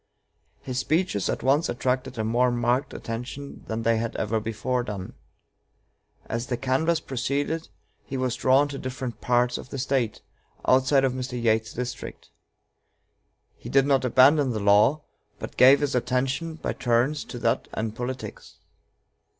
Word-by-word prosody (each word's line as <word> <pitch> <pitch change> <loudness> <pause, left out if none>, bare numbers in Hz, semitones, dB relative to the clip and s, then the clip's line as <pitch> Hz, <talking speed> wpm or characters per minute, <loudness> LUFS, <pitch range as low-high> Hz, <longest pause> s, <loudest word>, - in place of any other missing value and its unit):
His 130 -1 -3
speeches 155 - 0
at - - -2
once 140 +5 +2
attracted 130 +1 -1
a 110 - -1
more 120 +3 +2
marked 120 +2 0
attention 125 +5 -7
than 110 +1 -3
they 115 0 +3
had 115 0 -3
ever 110 +1 0
before 115 +3 -2
done. 100 -6 -6 1.1
As 115 +1 -3
the 120 - -2
canvass 135 +6 +1
proceeded 140 +4 -2 0.3
he 135 - -5
was 130 -2 -1
drawn 130 +3 +3
to 140 -1 -6
different 130 -2 -5
parts 125 0 +1
of - - -10
the - - -6
State, 130 -4 -1 0.5
outside 130 +1 +4
of 130 -2 +2
Mr. 130 -1 -4
Yates's 110 -1 +1
district. 125 +1 -6 1.2
He - - -10
did 135 0 +4
not 135 -2 +2
abandon 130 +3 +5
the 110 - -2
law, 105 +9 +4 0.3
but - - -8
gave 135 +3 +7
his 145 -1 0
attention 135 +6 -1
by - - -3
turns 125 +5 +1
to 125 - -8
that 115 -1 0
and 110 0 -3
politics. 125 +1 -6
125 Hz, 150 wpm, -25 LUFS, 115-135 Hz, 1.2 s, gave